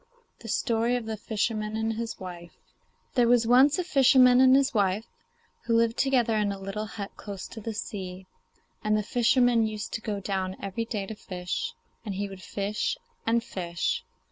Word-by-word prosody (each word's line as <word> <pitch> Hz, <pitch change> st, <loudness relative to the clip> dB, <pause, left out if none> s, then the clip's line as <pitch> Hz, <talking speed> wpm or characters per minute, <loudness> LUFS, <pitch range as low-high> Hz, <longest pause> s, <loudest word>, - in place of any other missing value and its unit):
THE -, -, -10 dB
STORY 235 Hz, 0 st, +1 dB
OF 245 Hz, -2 st, -3 dB
THE 220 Hz, 0 st, -3 dB
FISHERMAN 215 Hz, 0 st, -2 dB
AND 220 Hz, 0 st, 0 dB
HIS 230 Hz, +1 st, -5 dB
WIFE 175 Hz, -2 st, -8 dB, 0.6 s
There 245 Hz, -3 st, +4 dB
was 240 Hz, -1 st, +4 dB
once 260 Hz, +6 st, +5 dB
a 365 Hz, -, 0 dB
fisherman 260 Hz, -6 st, +6 dB
and 260 Hz, 0 st, +7 dB
his 275 Hz, 0 st, +3 dB
wife 205 Hz, 0 st, +1 dB, 0.6 s
who 230 Hz, -, +2 dB
lived 230 Hz, 0 st, +2 dB
together 245 Hz, -5 st, +2 dB
in 210 Hz, -1 st, +1 dB
a 200 Hz, -, -4 dB
little 195 Hz, +2 st, -4 dB
hut 200 Hz, -2 st, -6 dB
close 200 Hz, -2 st, -7 dB
to 225 Hz, -, -9 dB
the 220 Hz, +1 st, -5 dB
sea, 190 Hz, -3 st, -6 dB, 0.6 s
and 215 Hz, 0 st, +2 dB
the 210 Hz, -, 0 dB
fisherman 240 Hz, 0 st, +3 dB
used 215 Hz, -1 st, -5 dB
to 225 Hz, -, -3 dB
go 210 Hz, -3 st, -3 dB
down 190 Hz, -1 st, -2 dB
every 200 Hz, +4 st, -3 dB
day 210 Hz, -3 st, -3 dB
to 220 Hz, -, -6 dB
fish; 200 Hz, -, -4 dB, 0.3 s
and 205 Hz, -4 st, -4 dB
he 200 Hz, +1 st, -2 dB
would 195 Hz, -1 st, -10 dB
fish 200 Hz, +3 st, -2 dB, 0.3 s
and 230 Hz, 0 st, +2 dB
fish. 175 Hz, -5 st, -2 dB
220 Hz, 185 wpm, -27 LUFS, 200-240 Hz, 0.6 s, and